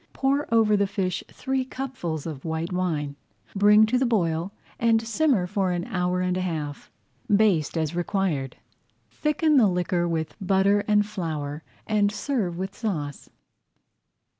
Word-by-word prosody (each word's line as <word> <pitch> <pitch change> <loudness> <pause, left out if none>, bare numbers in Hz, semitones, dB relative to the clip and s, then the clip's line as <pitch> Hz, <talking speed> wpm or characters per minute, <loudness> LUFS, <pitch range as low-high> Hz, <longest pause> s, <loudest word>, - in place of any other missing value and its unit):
Pour 275 0 0
over 220 -2 +4
the 200 -1 +2
fish 190 -2 -2
three 265 0 -2
cupfuls 255 - -5
of 150 -5 -6
white 165 +2 -3
wine, 155 -6 -1 0.4
bring 210 +2 +6
to 250 +3 +1
the 265 - +2
boil, 175 -5 0 0.3
and 230 -1 +4
simmer 230 -2 +1
for 190 0 0
an 175 -1 -2
hour 180 -5 -1
and 180 0 0
a - - -1
half. 155 -5 -4 0.4
Baste 200 -7 +2
as 160 0 -1
required. 175 -7 -1 0.6
Thicken 300 0 +2
the 230 -5 +6
liquor 180 -1 0
with 160 -2 -2
butter 195 +1 +3
and 210 -1 +4
flour 155 -7 -4 0.2
and 205 -1 +2
serve 210 -7 -2
with 190 +1 -3
the - - -21
sauce. 155 - -4
190 Hz, 150 wpm, -25 LUFS, 165-220 Hz, 0.6 s, bring